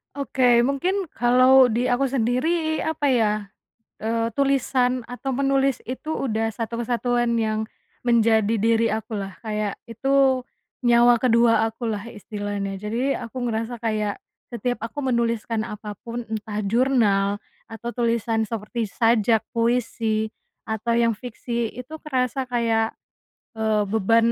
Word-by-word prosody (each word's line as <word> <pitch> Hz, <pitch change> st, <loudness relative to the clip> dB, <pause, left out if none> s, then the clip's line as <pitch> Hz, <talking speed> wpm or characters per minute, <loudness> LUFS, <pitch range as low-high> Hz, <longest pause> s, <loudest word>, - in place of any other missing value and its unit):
Oke 255 Hz, -3 st, +3 dB
mungkin 345 Hz, +9 st, 0 dB
kalau 255 Hz, +1 st, +6 dB
di 240 Hz, +3 st, +1 dB
aku 245 Hz, +2 st, +1 dB
sendiri 275 Hz, +6 st, 0 dB
apa 305 Hz, -2 st, -1 dB
ya? 230 Hz, -5 st, +3 dB, 0.7 s
Eee, 230 Hz, +1 st, 0 dB
tulisan 255 Hz, -3 st, +1 dB
atau 245 Hz, +2 st, -5 dB
menulis 275 Hz, 0 st, +1 dB
itu 260 Hz, +5 st, -5 dB
udah 225 Hz, -6 st, -1 dB
satu 230 Hz, +1 st, -4 dB
kesatuan 240 Hz, 0 st, 0 dB
yang 220 Hz, -1 st, 0 dB, 0.4 s
menjadi 225 Hz, -2 st, +3 dB
diri 225 Hz, +1 st, +2 dB
aku 220 Hz, +1 st, -3 dB
lah 195 Hz, -3 st, -5 dB
kayak 210 Hz, -2 st, -3 dB
itu, 265 Hz, +2 st, +2 dB, 0.4 s
nyawa 240 Hz, 0 st, +6 dB
kedua 235 Hz, -2 st, +4 dB
aku 225 Hz, +1 st, -5 dB
lah 210 Hz, -2 st, -2 dB
istilahnya 205 Hz, -1 st, -4 dB
jadi 230 Hz, +7 st, -2 dB
aku 230 Hz, +3 st, -7 dB
ngerasa 230 Hz, +2 st, -3 dB
kayak, 215 Hz, -3 st, -1 dB, 0.3 s
setiap 245 Hz, +1 st, -2 dB
aku 230 Hz, -, -7 dB
menuliskan 235 Hz, -3 st, 0 dB
apa 210 Hz, -1 st, -7 dB
pun 235 Hz, 0 st, -5 dB
entah 215 Hz, -1 st, -4 dB
jurnal 205 Hz, -4 st, +2 dB, 0.3 s
atau 225 Hz, +1 st, -7 dB
tulisan 230 Hz, -1 st, +1 dB
seperti 225 Hz, +1 st, -3 dB
sajak, 225 Hz, -1 st, +3 dB
puisi, 230 Hz, -2 st, 0 dB, 0.4 s
atau 220 Hz, +2 st, -1 dB
yang 230 Hz, -1 st, +3 dB
fiksi 235 Hz, 0 st, -4 dB
itu 250 Hz, +6 st, -9 dB
kerasa 260 Hz, -2 st, -1 dB
kayak, 230 Hz, -2 st, +1 dB, 0.6 s
eee 220 Hz, -2 st, +1 dB
beban 225 Hz, +3 st, +3 dB
235 Hz, 130 wpm, -23 LUFS, 220-250 Hz, 0.7 s, kalau